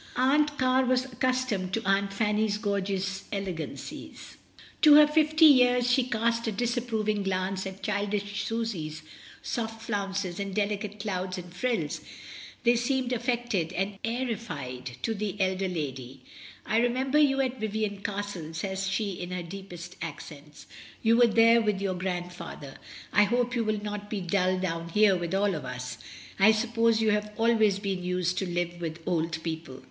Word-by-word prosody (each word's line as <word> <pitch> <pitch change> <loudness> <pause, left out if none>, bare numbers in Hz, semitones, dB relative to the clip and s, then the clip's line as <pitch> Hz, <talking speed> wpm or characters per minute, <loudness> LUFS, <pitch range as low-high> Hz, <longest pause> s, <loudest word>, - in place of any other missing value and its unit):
SUSANNA - - -16
AT 255 - +3
HOME. - - +5
21$ - - -2
Aunt 290 - -15
Car 260 0 +3
was 255 0 +2
accustomed 255 -7 -1
to 225 - 0
Aunt 195 0 +2
Fanny's 210 0 +1
gorgeous 195 -2 -2
elegancies, 190 -5 -6 0.4
to 300 -2 +9
her 300 0 +9
fifty 310 +1 +4
years; 250 -3 +6
she 250 0 +3
cast 230 0 0
a - - +1
disapproving 225 -2 -1
glance 190 0 -1
at 190 0 -9
childish 205 -1 -1
Susy's 180 -10 -3 0.4
soft 225 -1 -3
flounces 195 -3 -2
and 195 -1 -4
delicate 210 0 -2
clouds 185 -3 -3
and 175 -1 -8
frills, 195 -7 -1 0.6
they 240 0 +5
seemed 255 +1 0
affected 240 -8 -1
and 195 +1 -3
airified 165 - -4
to 225 - 0
the 205 -1 -4
elder 190 0 +1
lady. 135 -6 -5 0.4
"I 220 - +1
remember 260 +4 +2
you 275 -2 +4
at 260 -1 0
Vivian 215 -2 -2
Castle," 200 -6 -4
says 190 +3 -2
she 200 +1 -1
in 175 -1 -6
her 180 -1 -4
deepest 175 -1 -9
accents, 150 -2 -8 0.4
"you 225 0 +5
were 240 0 +6
there 230 +1 +5
with 210 -3 0
your 195 -1 -1
grandfather. 175 -5 -5 0.4
I 210 - +6
hope 245 +3 0
you 235 - +1
will 215 -1 -1
not 205 0 -5
be 210 - -2
dull 185 +1 +1
down 165 -2 -3
here 210 +2 +4
with 175 0 -2
all 200 0 +2
of 155 -4 -4
us. 125 -1 -6 0.4
I 215 +3 +7
suppose 230 0 +2
you 215 - +3
have 210 0 0
always 220 -3 +3
been 195 -3 -3
used 180 0 0
to 190 - -2
live 175 0 -2
with 160 -1 -3
old 165 -1 -1
people?" 160 -5 -5
205 Hz, 170 wpm, -28 LUFS, 180-230 Hz, 0.6 s, to